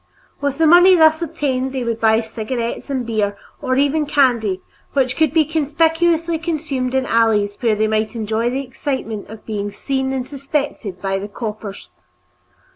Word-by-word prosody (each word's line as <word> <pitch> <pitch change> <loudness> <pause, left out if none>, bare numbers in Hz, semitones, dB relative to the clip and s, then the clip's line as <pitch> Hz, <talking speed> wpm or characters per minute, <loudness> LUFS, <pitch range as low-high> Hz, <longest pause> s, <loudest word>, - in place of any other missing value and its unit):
With 285 -1 -1
the 325 - +3
money 355 +3 +7
thus 315 -1 +5
obtained 265 -5 -2
they 260 -2 -2
would 230 -1 -3
buy 220 0 +4
cigarettes 230 +3 -4
and 260 -3 -2
beer 210 -3 -1 0.2
or 255 - 0
even 285 +2 +2
candy, 235 -10 +2 0.3
which 260 -2 +1
could 315 -3 +2
be 315 0 +3
conspicuously 325 +2 +1
consumed 295 -6 -2
in 265 - +2
the - - -6
alleys 215 -3 +2
where 230 -4 +2
they 215 +1 +1
might 215 +1 -1
enjoy 220 +1 -1
the 270 +2 -3
excitement 250 -5 -4
of 220 0 -11
being 205 -2 -3
seen 265 +5 -2
and 260 -2 -2
suspected 275 -8 -3
by 195 0 0
the 200 - -5
"coppers." 210 - -7
255 Hz, 170 wpm, -19 LUFS, 220-295 Hz, 0.3 s, money